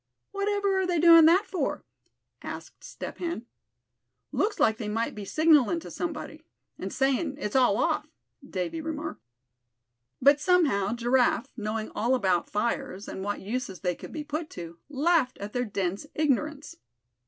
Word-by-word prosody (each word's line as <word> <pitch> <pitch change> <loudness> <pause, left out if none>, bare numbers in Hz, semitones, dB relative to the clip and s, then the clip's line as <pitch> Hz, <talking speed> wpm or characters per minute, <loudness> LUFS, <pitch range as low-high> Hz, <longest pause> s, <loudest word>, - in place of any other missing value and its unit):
"Whatever 400 -1 0
are 375 - 0
they 355 -1 +1
doing 330 0 +8
that 360 +6 +5
for?" 375 -3 -2 0.6
asked - - -8
Step - - -8
Hen. 335 -9 -3 0.9
"Looks 420 0 0
like 220 0 +3
they 215 -2 -4
might 225 +2 -1
be 210 -1 -7
signallin' 315 - +4
to - - -9
somebody, 310 -2 -5 0.4
and - - -4
sayin' 275 +2 0
'it's 210 -6 -4
all 250 -6 +4
off,'" - - 0 0.3
Davy 190 - -3
remarked. 310 0 -5 1.0
But 280 +2 +5
somehow 275 - +3
Giraffe, 245 +1 +2
knowing 215 -1 -3
all 240 +4 +1
about 190 -7 +1
fires, 210 -2 -2
and 190 - -5
what 205 +1 -3
uses 210 -2 -4
they 180 -2 0
could - - -10
be 310 - -5
put 305 +2 -4
to, 170 -1 -8
laughed 295 -2 +2
at 205 +1 -7
their 245 0 0
dense 195 +3 -3
ignorance. 300 0 -1
270 Hz, 155 wpm, -27 LUFS, 210-320 Hz, 1.0 s, doing